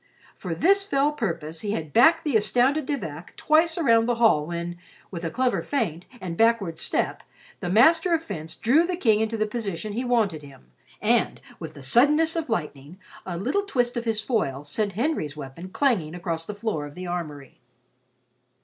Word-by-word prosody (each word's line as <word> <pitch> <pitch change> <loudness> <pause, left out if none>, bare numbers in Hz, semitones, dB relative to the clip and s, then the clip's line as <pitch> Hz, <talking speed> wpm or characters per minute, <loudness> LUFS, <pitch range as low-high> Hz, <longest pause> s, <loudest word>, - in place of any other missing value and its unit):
For - - -5
this 395 +3 +3
fell 290 -7 +1
purpose 165 - -4
he 205 -1 -2
had 155 -7 -5
backed 325 +7 +5
the 295 -7 -1
astounded 245 +8 +2
De 290 - 0
Vac 160 - -8
twice 320 +2 +3
around 230 -8 +3
the 240 - +1
hall 215 -11 +3
when, 170 0 -4 0.3
with 170 -2 -6
a 165 - -1
clever 255 +7 0
feint, 185 - -2
and 175 -4 -5
backward 220 -6 +2
step, - - -1 0.4
the 175 - -4
master 320 - +5
of 325 - -3
fence 160 - -6
drew 270 +9 +3
the 360 +1 -1
King 225 - +3
into 220 +1 -1
the 215 - +1
position 210 -3 -4
he 240 +4 -2
wanted 225 -10 +1
him, 135 - -16 0.3
and - - +2 0.2
with 155 -1 -8
the 140 - -11
suddenness 300 - +3
of 325 -4 -3
lightning, 150 -4 -4 0.3
a 175 -2 -3
little 270 - 0
twist 245 -12 -1
of 235 0 -3
his 220 -2 0
foil 175 - -1
sent 200 +7 -2
Henry's 210 - -2
weapon 150 +6 -8
clanging 190 - 0
across 165 -2 -4
the 210 - -5
floor 205 -9 -3
of 145 - -13
the 185 - -7
armory. 155 -6 -6
215 Hz, 185 wpm, -25 LUFS, 165-265 Hz, 0.4 s, backed